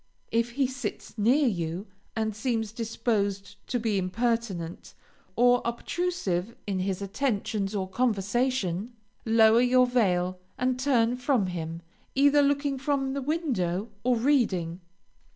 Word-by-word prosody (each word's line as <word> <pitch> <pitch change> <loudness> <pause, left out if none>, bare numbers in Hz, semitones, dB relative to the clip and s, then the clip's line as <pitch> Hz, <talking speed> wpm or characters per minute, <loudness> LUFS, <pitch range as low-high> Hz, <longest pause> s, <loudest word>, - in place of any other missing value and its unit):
If 230 +1 +1
he 275 +1 +2
sits 260 -3 -5
near 250 +7 +3
you 175 -2 -2 0.3
and 220 -2 -1
seems 225 -1 -1
disposed 210 -3 -2
to 245 - -1
be 220 -3 0
impertinent, 190 -3 -2 0.4
or 245 +1 +5
obtrusive 235 - -2
in 195 -2 -2
his 190 +1 -2
attentions 205 -2 -1
or 190 -2 -1
conversation, 220 -1 0 0.3
lower 225 +1 +6
your 250 0 +5
veil 185 -7 +1 0.2
and 255 0 0
turn 250 -3 +2
from 250 -4 +1
him, 165 -2 -5 0.3
either 285 +2 +5
looking 285 -1 +1
from 270 -1 0
the 280 - -2
window 240 - -1
or 250 0 +3
reading. 205 - +1
230 Hz, 125 wpm, -27 LUFS, 195-255 Hz, 0.4 s, lower